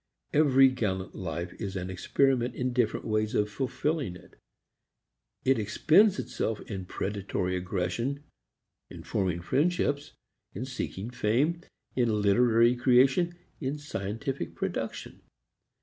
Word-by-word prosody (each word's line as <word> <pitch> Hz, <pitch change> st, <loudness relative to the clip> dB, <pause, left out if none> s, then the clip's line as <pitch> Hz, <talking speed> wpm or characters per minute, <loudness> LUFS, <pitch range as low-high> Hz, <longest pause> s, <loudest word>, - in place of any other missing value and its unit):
Every 135 Hz, -3 st, +6 dB
gallant 95 Hz, -7 st, -2 dB
life 85 Hz, -2 st, -4 dB
is 100 Hz, -3 st, -4 dB
an 95 Hz, 0 st, -3 dB
experiment 125 Hz, +6 st, +1 dB
in 125 Hz, 0 st, -1 dB
different 120 Hz, -3 st, 0 dB
ways 110 Hz, 0 st, 0 dB
of 105 Hz, 0 st, +1 dB
fulfilling 135 Hz, -, -2 dB
it. -, -, -15 dB, 1.1 s
It 130 Hz, -2 st, +4 dB
expends 165 Hz, -, +4 dB
itself 110 Hz, -1 st, -2 dB
in 95 Hz, -4 st, -6 dB
predatory 95 Hz, -2 st, -2 dB
aggression, 90 Hz, +10 st, -2 dB, 0.7 s
in -, -, -10 dB
forming 90 Hz, -4 st, -1 dB
friendships, 145 Hz, -, 0 dB, 0.4 s
in 115 Hz, +7 st, -3 dB
seeking 125 Hz, -4 st, -5 dB
fame, 130 Hz, +10 st, +1 dB, 0.3 s
in 115 Hz, -4 st, +2 dB
literary 115 Hz, +3 st, +4 dB
creation, 130 Hz, +8 st, +4 dB, 0.2 s
in 140 Hz, 0 st, -2 dB
scientific 135 Hz, -1 st, -4 dB
production. -, -, -4 dB
120 Hz, 115 wpm, -29 LUFS, 100-135 Hz, 1.1 s, Every